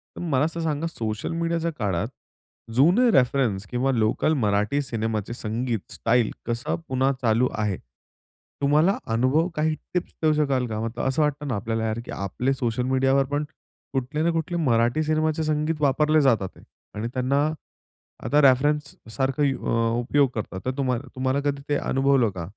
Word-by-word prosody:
तर - - -7
मला 145 -4 +1
असं 165 +1 -4
सांगा 160 0 -1
सोशल 110 -7 -4
मीडियाच्या 165 0 -1
काळात, 100 -1 0 0.7
जुने 185 - +5
रेफरन्स 125 - +2
किंवा 125 +2 0
लोकल 115 +5 +1
मराठी 105 +7 +1
सिनेमाचे 110 -4 -3
संगीत 115 -1 -3
स्टाईल 115 -1 +1
कसा 120 +1 -2
पुन्हा 130 +1 +1
चालू 120 +2 +2
आहे? 105 -4 -1 0.8
तुम्हाला 150 +7 +3 0.2
अनुभव 130 +8 +2
काही 155 +1 +1 0.2
टिप्स 180 - -2
देऊ 155 -1 +4
शकाल 140 -4 +1
का? 110 -2 -3
मतलब 115 +1 -3
असं 135 +4 +1
वाटत 150 0 0
ना 130 - -1
आपल्याला 110 +2 -2
यार, 110 +1 -2
की - - -8
आपले 100 +8 -1
सोशल 125 -2 -1
मीडियावर 135 +1 +3
पण 145 +1 +1 0.5
कुठले 135 +4 -2
ना 170 - +3
कुठले 165 +1 -2
मराठी 120 +5 +2
सिनेमाचे 155 +1 0
संगीत 155 0 -1
वापरले 150 +2 +3
जातात 115 -8 +2
आहे - - -17 0.3
आणि 105 +2 -3
त्यांना 130 +2 +1 0.9
आता 150 +1 +3
रेफरन्स 140 +2 +3 0.2
सारखं 135 +2 0
अ, 115 -4 0
उपयोग 140 +3 +2
करतात 100 -3 -4
तर 130 - +1
तुम्हाला 130 -3 -1
तुम्हाला 130 +1 0
कधी 140 -1 -1
ते 145 - +2 0.2
अनुभवलं 135 -3 +3
का? 85 -2 -4
135 Hz, 160 wpm, -24 LUFS, 115-150 Hz, 0.9 s, जुने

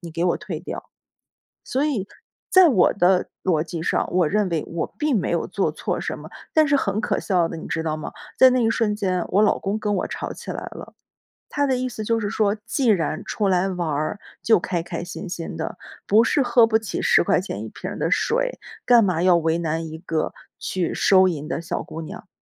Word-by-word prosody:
你 170 -3 -8
给 165 +2 -2
我 175 - +2
退 170 -6 -6
掉。” 170 - -6 0.8
所 270 +3 -1
以， 235 -10 -1 0.4
在 375 -1 +7
我 210 - +4
的 185 -1 +3 0.2
逻 160 -5 +2
辑 170 0 -6
上， - - 0
我 180 -2 +3
认 205 +2 +1
为 165 -3 -1
我 165 -1 -4
并 300 -4 +1
没 - - -2
有 - - 0
做 - - 0
错 - - -3
什 - - -3
么， - - -10 0.2
但 310 -1 +4
是 285 - +2
很 210 -6 +1
可 - - -1
笑 180 -4 +1
的， - - -6
你 160 - -8
知 160 - -1
道 155 -1 -1
吗？ 155 - -6 0.3
在 260 - +7
那 250 -2 +2
一 225 - +3
瞬 215 -2 0
间， 185 -4 -1
我 200 +3 +3
老 215 - +3
公 200 +2 -2
跟 210 -1 -1
我 - - -1
吵 - - -5
起 - - -9
来 - - -3 0.2
了， - - -10 0.6
他 285 -1 0
的 260 -2 +1
意 255 0 -1
思 220 -3 -6
就 230 +1 +1
是 205 -2 -2
说， 210 -1 +1
既 265 -4 0
然 165 -7 +1
出 210 - -1
来 185 0 +2
玩 180 -3 -2
儿， 155 +7 -2 0.2
就 220 - +5
开 175 -1 -2
开 170 -1 -5
心 175 +2 -7
心 170 -1 -5
的， 160 - -5 0.3
不 220 +3 +5
是 280 - +2
喝 245 -3 +5
不 220 -1 +3
起 220 -1 -4
10 - - +4
块 - - +2
钱 - - -5
1 - - -6
瓶 - - -7
儿 - - -6
的 - - -1
水， - - 0 0.3
干 240 -2 +6
嘛 180 -2 0
要 180 -2 +5
为 165 0 +1
难 165 0 -2
一 160 - -7
个 165 -3 -2 0.3
去 180 -3 -2
收 190 -1 +5
银 150 -3 -4
的 165 - -3
小 170 - -3
姑 160 - -8
娘。 160 - -9
190 Hz, 245 characters per minute, -23 LUFS, 170-225 Hz, 0.8 s, 在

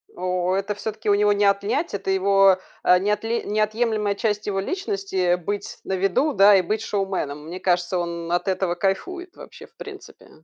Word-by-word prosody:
О, 180 0 -1
это 195 +2 -1
всё-таки 215 +1 -4
у 200 - +5
него 205 0 +3
не 205 0 +1
отнять, 200 +11 0
это 195 -1 -4
его, 195 0 +4 0.3
а, 180 0 +5
неотле 210 +4 -1
неотъемлемая 215 0 0
часть 210 0 -2
его 195 -1 -1
личности- 195 - -1
быть 200 +4 -5
на - - -4
виду, 195 +11 +1
да, 200 -2 +7
и - - +3
быть 215 +5 -2
шоуменом. 190 -9 -3
Мне 175 +3 -7
кажется, 180 -1 0
он 170 -1 -4
от 175 +1 0
этого 185 -2 0
кайфует 350 - -3
вообще - - -12
в - - -34
принципе. - - -11
195 Hz, 180 wpm, -23 LUFS, 185-210 Hz, 0.3 s, да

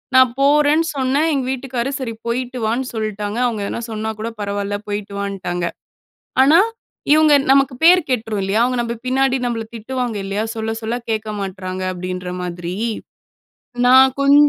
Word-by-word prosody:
நான் 260 -2 +6
போறேன்னு 295 +3 +4
சொன்னேன். 270 +4 +2
எங்க 265 -2 0
வீட்டுக்காரு, 265 -1 -3
சரி 240 -3 -4
போயிட்டுவான்னு 245 0 -1
சொல்ட்டாங்க. 215 -1 -3
அவுங்க 220 -4 -1
எதனா 235 - -4
சொன்னா 220 0 -3
கூட 225 - -3
பரவால்ல, 200 0 -2
போய்ட்டு 205 0 -4
வான்ட்டாங்க. 185 -3 -3 0.8
ஆனா, 300 +5 +6 0.5
இவங்க 310 -1 +6 0.2
நமக்கு 275 -1 +4
பேர் 360 +2 +8
கெட்டுரும் 225 -4 -1
இல்லையா? 195 +4 +1
அவங்க 250 +1 0
நம்ப 235 0 -3
பின்னாடி 265 +1 +2
நம்மள 230 -2 -2
திட்டுவாங்க 245 0 -3
இல்லையா? 200 +2 -2
"சொல்ல, 220 0 -3
சொல்ல 225 +2 -2 0.2
கேட்க 220 0 -2
மாட்றாங்க" 185 -1 -5
அப்படின்ற 180 0 -5
மாதிரி. 175 0 -5 1.1
நான் 260 +1 +7
கொஞ் 280 +1 +5
230 Hz, 145 wpm, -19 LUFS, 205-265 Hz, 1.1 s, பேர்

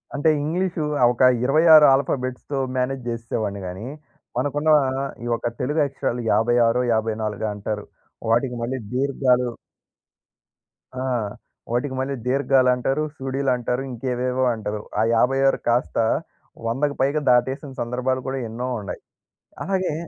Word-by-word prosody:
అంటే 145 +3 +2
ఇంగ్లీషు 175 +1 -1 0.2
ఆ - - +5
ఒక 120 - -6 0.2
26 155 +2 +7
ఆల్ఫాబెట్స్‌తో 135 0 -1 0.2
మేనేజ్ 125 0 -1
జేస్సేవాడిని 115 -4 -3
గాని, 95 +6 -6 0.5
మనకున్న 145 +4 0 0.2
ఆహ్, 135 +1 -2 0.2
ఈ - - -5
యొక్క 115 - -1
తెలుగు 150 +4 +1
అక్షరాలు 130 -3 -3
యాభై 115 +3 +3
ఆరో, 125 +2 +2
యాభైనాలుగో 110 -1 -1
అంటారు. 105 0 -4 0.5
వాటికి 125 +1 +1
మళ్ళీ 130 +2 -2 0.2
దీర్ఘాలు 125 -2 +2 1.5
ఆహ్, 120 -5 -1 0.4
వాటికి 130 +3 -1
మళ్ళీ 135 +1 -2
దీర్ఘాలు 135 -1 +3
అంటారు, 135 +4 -1
సుడీలు 135 0 -1
అంటారు 125 +1 -2
ఇంకేవేవో 125 +1 -1
అంటారు. 105 -2 -4 0.2
ఆ - - +4
56 135 +3 +3
కాస్త 120 +2 +1 0.7
100కు 140 +5 0
పైగా 145 +3 +1
దాటేసిన 130 +4 +2
సందర్భాలు 125 +2 -1
కూడా 135 0 -2
ఎన్నో 120 +3 -4
ఉన్నాయి. 100 - -7 0.6
అలాగే 190 -4 -1
130 Hz, 125 wpm, -23 LUFS, 120-140 Hz, 1.5 s, 26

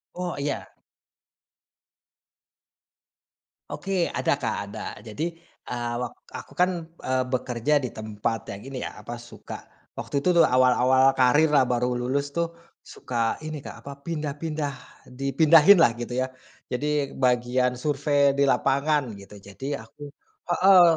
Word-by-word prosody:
Oh, 180 -1 -3
iya. 140 0 -4 3.0
Oke, 190 -2 -1
ada - - +1
Kak, - - -2 0.2
ada. - - -7 0.2
Jadi, 110 +8 -6 0.5
eee, 120 -1 -2
wak 125 - -4 0.2
aku - - -8
kan, 180 +1 +4 0.3
eee, 130 0 0
bekerja 125 +1 0
di 130 -3 -3
tempat 110 +1 -3
yang 100 - -8
ini 135 -1 -6
ya, - - -7
apa, 120 - -7
suka 120 0 -10 0.3
waktu 140 - -2
itu 180 +4 +2
tuh, 170 - +7
awal-awal 130 0 +4
karir 135 +5 +5
lah, 140 - +6
baru 125 0 0
lulus 140 +4 -2
tuh, 170 0 0 0.3
suka 115 -2 -2
ini 155 -2 -6
Kak, - - -9
apa, 140 - -7
pindah-pindah 150 -2 -3 0.4
dipindahin 155 +7 +6
lah, 120 -8 +5
gitu 120 +1 -6
ya. 130 0 +1 0.4
Jadi, 145 +2 -1
bagian 125 0 +1
survei 145 0 +2
di 140 - +3
lapangan, 140 -1 +1
gitu, 100 +1 -12
jadi 135 +9 -6
aku 145 -1 -11 0.4
heeh, 185 +1 +7
135 Hz, 135 wpm, -25 LUFS, 125-150 Hz, 3.0 s, tuh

